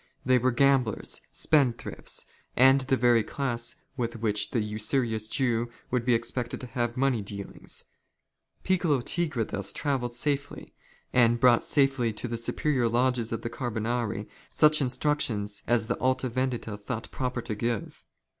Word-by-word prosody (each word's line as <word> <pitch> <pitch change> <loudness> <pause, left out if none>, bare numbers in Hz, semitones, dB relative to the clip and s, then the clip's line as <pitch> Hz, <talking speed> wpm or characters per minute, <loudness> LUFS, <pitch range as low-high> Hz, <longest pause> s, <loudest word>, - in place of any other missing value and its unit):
They 130 0 +4
were 130 +2 +2
gamblers, 130 -3 +2
spendthrifts, 140 -6 0 0.3
and 130 +2 +6
the 130 0 +1
very 120 -2 +4
class 120 -1 -2 0.2
with 120 -3 -2
which 105 -2 0
an 115 -4 +1
usurious 110 +1 0
Jew 120 -3 +1 0.2
would 125 -2 0
be 125 -2 +4
expected 120 +1 -2
to - - -5
have 120 -1 -2
money 130 -4 +2
dealings. 100 0 -7 0.8
Piccolo 170 -8 +2
Tigre 155 -4 -1
thus 100 -2 -3
travelled 130 -3 -1
safely; 140 +3 -2 0.4
and 120 -1 +4
brought 120 -2 +5
safely 135 -5 +2
to 115 - -5
the 120 - -3
superior 120 +1 0
lodges 120 -1 +1
of 115 - -3
the 115 - -2
Carbonari, 115 -3 -2 0.2
such 150 0 +5
instruci:ions 125 -7 0
as 120 -1 +2
the 120 - -2
Alta 130 -1 +1
Yendita 120 -4 -2
thought 110 +2 -5
proper 125 -1 -2
to - - -4
give. 115 0 -3
120 Hz, 145 wpm, -28 LUFS, 115-130 Hz, 0.8 s, and